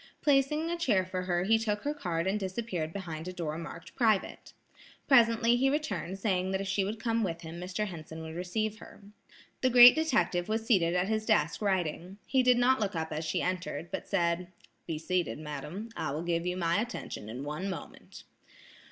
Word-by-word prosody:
Placing 300 +3 +2
a 345 - -1
chair 210 - +2
for 185 0 -3
her 175 -1 0
he 225 +3 +3
took 210 -2 -2
her 290 - -1
card 175 - -2
and 195 +3 0
disappeared 190 -4 -3
behind 165 -3 -6
a - - -3
door 165 -4 -4
marked 170 0 -9
"Private." 220 -5 0 0.6
Presently 235 -2 +5
he 270 +2 +3
returned 290 - -2
saying 190 -2 0
that 190 0 -1
if 195 - -4
she 195 +1 +1
would 210 +3 -4
come 230 0 0
with 170 -3 -3
him, 165 +1 -8
Mr. 185 +4 -3
Henson 160 -4 -8
would 160 0 -7
receive 215 +5 -2
her. - - -14 0.6
The 255 - +3
great 245 0 +10
detective 260 - +1
was 220 +1 -1
seated 180 -7 +3
at 180 +1 +1
his 215 0 0
desk 185 -7 +2
writing. 185 -1 -1
He 265 - +2
did 250 -1 +4
not 255 +2 +4
look 205 -3 -1
up 160 -1 -3
as 155 +1 -3
she 155 - -1
entered, 180 -2 -3
but - - -4
said: 175 -2 0 0.4
"Be 160 - -2
seated, 180 +2 -1
madam; 150 +8 -6
I - - -2
will 150 +4 -3
give 170 0 -1
you 180 0 -1
my 170 +2 +1
attention 230 - -6
in 125 +4 -6
one 150 +7 -4
moment." 190 - -9
190 Hz, 200 wpm, -30 LUFS, 170-225 Hz, 0.6 s, great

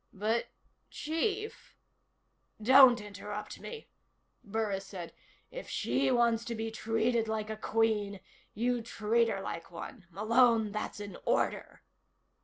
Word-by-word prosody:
"But, 220 +4 0 0.4
Chief 400 +8 -3 0.4
" - - -31
"Don't 260 -2 +9
interrupt 210 0 -7
me," 460 -1 -8 0.6
Burris 205 -3 -2
said. 180 -4 -7 0.4
"If - - -8
she 130 +3 +1
wants 235 -1 +3
to 235 - -3
be 225 0 -3
treated 225 +1 0
like 220 0 -2
a - - -3
Queen, 215 -2 0 0.4
you 245 +2 0
treat 230 0 +1
her 195 - -2
like 165 -3 -6
one. 180 +3 -9
Malone, 225 +3 +3
that's 215 0 -4
an 205 -3 -7
order!" - - -1
220 Hz, 125 wpm, -31 LUFS, 205-235 Hz, 0.6 s, Don't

